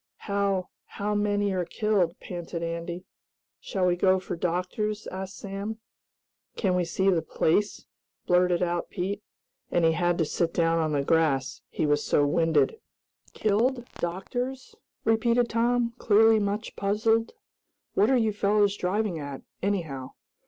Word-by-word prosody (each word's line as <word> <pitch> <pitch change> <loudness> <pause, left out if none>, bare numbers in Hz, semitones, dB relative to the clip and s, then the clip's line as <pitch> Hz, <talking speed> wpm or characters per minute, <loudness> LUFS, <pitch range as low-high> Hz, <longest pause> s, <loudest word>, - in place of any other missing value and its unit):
"How 200 -2 0 0.3
how 205 +1 -1
many 205 -1 +1
are 185 -1 0
killed?" 190 -2 0
panted 170 -1 -6
Andy. 170 +1 -4 0.5
"Shall 190 -2 -1
we 180 -1 +3
go 185 +1 +3
for 185 - -5
doctors?" 185 +5 -2
asked 190 +1 -6
Sam. 200 +3 -5 0.8
"Can 190 -4 +1
we 180 -1 +1
see 190 +3 +2
the 170 -3 +2
place?" 205 +8 0 0.4
blurted 180 0 +3
out 175 -1 -1
Pete, 195 +2 -3 0.5
and 175 -1 +2
he 165 - +5
had 175 +1 +1
to 165 - +2
sit 165 +2 -1
down 165 -1 +2
on 155 -2 0
the 140 -1 +1
grass, 145 -4 +1
he - - -1
was 145 0 +2
so 145 - +3
winded. 165 - +2 0.5
"Killed? 240 +4 +1
Doctors?" 245 +9 -4 0.3
repeated 235 +2 +3
Tom, 235 +1 +1
clearly 220 +1 +5
much 205 +1 -2
puzzled. 225 +3 +1 0.6
"What 210 +4 +3
are 265 - +4
you 220 -3 +1
fellows 205 0 +2
driving 195 -2 -1
at, 140 -2 -7 0.2
anyhow?" 160 -10 -2
190 Hz, 145 wpm, -27 LUFS, 170-210 Hz, 0.8 s, he